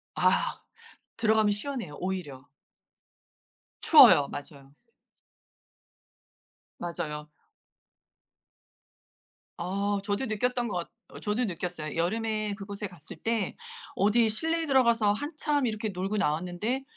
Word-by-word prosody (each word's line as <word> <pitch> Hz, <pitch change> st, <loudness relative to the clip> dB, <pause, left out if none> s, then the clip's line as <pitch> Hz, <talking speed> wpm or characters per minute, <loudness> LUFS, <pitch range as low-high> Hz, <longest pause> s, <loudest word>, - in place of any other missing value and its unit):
아. -, -, +2 dB, 0.6 s
들어가면 220 Hz, -2 st, +3 dB
시원해요 225 Hz, -, -5 dB
오히려. 175 Hz, -8 st, -4 dB, 1.4 s
추워요. 145 Hz, -1 st, +8 dB
맞아요. 140 Hz, -1 st, -9 dB, 2.0 s
맞아요. 150 Hz, -3 st, -5 dB, 2.3 s
아 200 Hz, +3 st, -1 dB
저도 205 Hz, +5 st, -1 dB
느꼈던 245 Hz, +2 st, -1 dB
것 180 Hz, -5 st, -3 dB, 0.2 s
어 -, -, -11 dB
저도 210 Hz, +4 st, -1 dB
느꼈어요. 175 Hz, -5 st, -4 dB
여름에 215 Hz, +3 st, -1 dB
그곳에 200 Hz, 0 st, -6 dB
갔을 170 Hz, -4 st, -11 dB
때 225 Hz, -3 st, -2 dB, 0.4 s
어디 220 Hz, +3 st, +4 dB
실내에 325 Hz, +9 st, 0 dB
들어가서 235 Hz, -7 st, +4 dB
한참 290 Hz, +2 st, -1 dB
이렇게 215 Hz, -1 st, -2 dB
놀고 195 Hz, +2 st, -2 dB
나왔는데 180 Hz, -, -1 dB
205 Hz, 225 characters per minute, -28 LUFS, 175-230 Hz, 2.3 s, 추워요